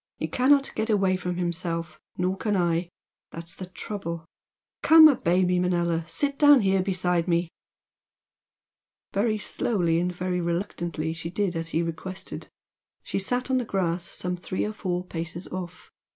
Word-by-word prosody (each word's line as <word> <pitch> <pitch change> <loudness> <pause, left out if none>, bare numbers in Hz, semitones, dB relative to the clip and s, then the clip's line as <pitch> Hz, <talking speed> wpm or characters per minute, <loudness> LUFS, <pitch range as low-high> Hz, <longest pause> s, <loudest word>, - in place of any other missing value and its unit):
He - - -2
cannot 270 +2 +3
get 220 - -2
away 195 -3 +3
from 180 -1 -3
himself 170 -2 -3 0.2
nor 180 +1 0
can 210 +1 -1
I! 170 -1 +1 0.4
That's 165 0 -8
the 185 - -8
trouble! 180 -4 -6 0.6
Come, 320 0 +9
obey 185 - +2
me, 180 0 +2
Manella! 170 -2 0
Sit 280 - 0
down 290 -3 +7
here 190 -1 +2
beside 180 -2 0
me!" 170 -1 +1 1.6
Very 215 +2 +1
slowly 175 -6 0
and 180 +1 0
very 180 0 -2
reluctantly 170 -2 -2
she 165 0 -5
did 185 0 -1
as 165 0 -3
he 165 +1 0
requested. 170 +3 -6 0.6
She - - -2
sat 245 +6 -1
on 260 - +3
the - - -1
grass 180 -5 -1
some 180 +1 -3
three 180 +1 -3
or 210 - -3
four 180 -4 -3
paces 170 +1 -4
off. 180 -1 -7
180 Hz, 155 wpm, -26 LUFS, 170-200 Hz, 1.6 s, Come